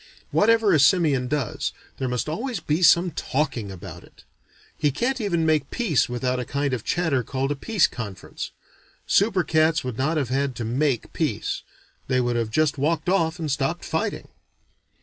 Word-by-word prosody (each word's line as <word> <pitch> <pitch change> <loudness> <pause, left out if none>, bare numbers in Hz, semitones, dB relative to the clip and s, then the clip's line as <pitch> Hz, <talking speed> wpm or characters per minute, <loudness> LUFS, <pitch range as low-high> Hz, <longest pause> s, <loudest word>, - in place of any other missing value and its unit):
Whatever 225 -2 +4
a 155 - +4
simian 140 -4 +4
does, 140 -4 -2 0.3
there 130 - -1
must 125 +2 -2
always 230 - -3
be 155 +1 -1
some 175 0 +5
talking 130 -9 -2
about 95 -2 -9
it. - - -19 0.5
He 150 - +1
can't 245 - -1
even 170 -6 0
make 155 -3 +2
peace 185 - +1
without 125 +1 -1
a - - -1
kind 140 +2 -1
of 120 -4 -2
chatter 160 -7 +1
called 135 +3 -2
a - - 0
peace 200 +5 +2
conference. 105 -6 -6 0.6
Super 200 -3 +3
cats 155 0 +2
would 125 -2 -5
not 155 +5 +1
have 140 -5 -1
had 135 0 0
to 120 - -4
"make" 125 +1 0
peace: - - -2 0.5
they 130 -1 +2
would 120 -1 0
have 115 -2 0
just 150 +3 +1
walked 155 +3 0
off 170 -3 +1
and 160 -4 -3
stopped 135 0 -1
fighting. - - -2
145 Hz, 175 wpm, -24 LUFS, 130-170 Hz, 0.6 s, some